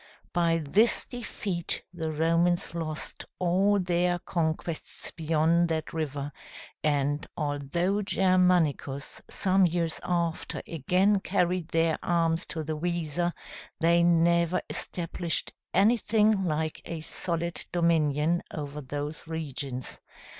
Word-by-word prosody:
By 170 -2 +3
this 215 +10 +4
defeat 205 -7 -4
the 160 -2 -3
Romans 165 +3 +1
lost 155 -2 -5
all 190 +3 +3
their 175 -1 +1
conquests 165 -2 -3
beyond 165 +1 +2
that 160 -1 -2
river; 145 -3 -3 0.5
and 145 0 +1
although 155 +7 0
Germanicus 180 -8 +2
some 190 -1 +3
years 165 -1 -1
after 170 -2 -1
again 185 +6 +2
carried 180 -3 0
their 165 -1 +1
arms 165 -1 +1
to 160 -2 -4
the 155 +1 -3
Weser, 170 +1 -1 0.5
they 170 +1 +4
never 170 0 +3
established 170 -1 -2 0.2
anything 215 -1 +3
like 155 -1 -1
a 165 -2 -5
solid 170 +1 -2
dominion 165 -1 +2
over 150 -1 -5
those 145 +3 -5
regions. 140 -5 -5
170 Hz, 105 wpm, -28 LUFS, 155-180 Hz, 0.5 s, this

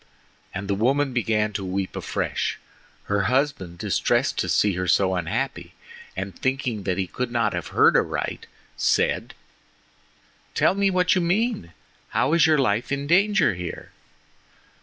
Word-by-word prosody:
And 95 +1 -5
the 100 - 0
woman 130 +6 +1
began 110 -3 0
to 100 - -3
weep 95 0 -3
afresh. - - -2 0.5
Her 100 -1 0
husband, 125 -8 0
distressed - - +1
to - - -1
see 105 -2 +3
her 90 +1 -2
so 95 +1 +3
unhappy, 110 +10 -3 0.4
and - - -4
thinking 130 -7 -2
that 95 -1 0
he 95 - 0
could 125 +6 -4
not 115 -4 +1
have 90 -2 -4
heard - - +4
aright, - - -1 0.3
said: - - 0 1.2
"Tell - - +3
me 200 0 +2
what 180 -1 +2
you 185 - +2
mean! 190 - 0 0.4
How 140 - +1
is 170 -1 +5
your 155 -1 +4
life 120 -4 0
in 140 0 -1
danger 195 - +3
here?" 90 -1 -7
120 Hz, 150 wpm, -24 LUFS, 95-145 Hz, 1.2 s, is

